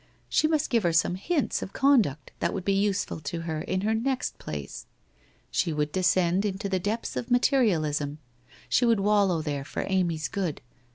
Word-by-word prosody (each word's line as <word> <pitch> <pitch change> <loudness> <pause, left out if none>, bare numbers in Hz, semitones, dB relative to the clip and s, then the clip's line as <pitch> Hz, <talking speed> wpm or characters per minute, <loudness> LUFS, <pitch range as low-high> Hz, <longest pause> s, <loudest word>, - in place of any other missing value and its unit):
She 310 - +3
must 310 -2 0
give 230 -2 +3
her 170 -3 +1
some 165 +2 +3
hints 285 - -1
of 195 - -6
conduct 225 - +2
that - - -1
would 190 - -4
be 195 - +2
useful 200 -3 0
to 155 +3 -4
her 160 -2 -3
in 185 +3 -2
her 215 +2 +1
next 255 +4 -1
place. - - -7 0.6
She 170 - +1
would 150 -1 -1
descend 185 0 +2
into 200 -1 -2
the 190 -1 0
depths 210 +5 -3
of 235 - -4
materialism, 165 - +2 0.5
she - - +2
would 230 -3 +4
wallow 195 -5 +2
there 145 -3 -3
for - - -4
Amy's 175 -5 0
good. 185 -8 -3
190 Hz, 180 wpm, -27 LUFS, 165-220 Hz, 0.6 s, would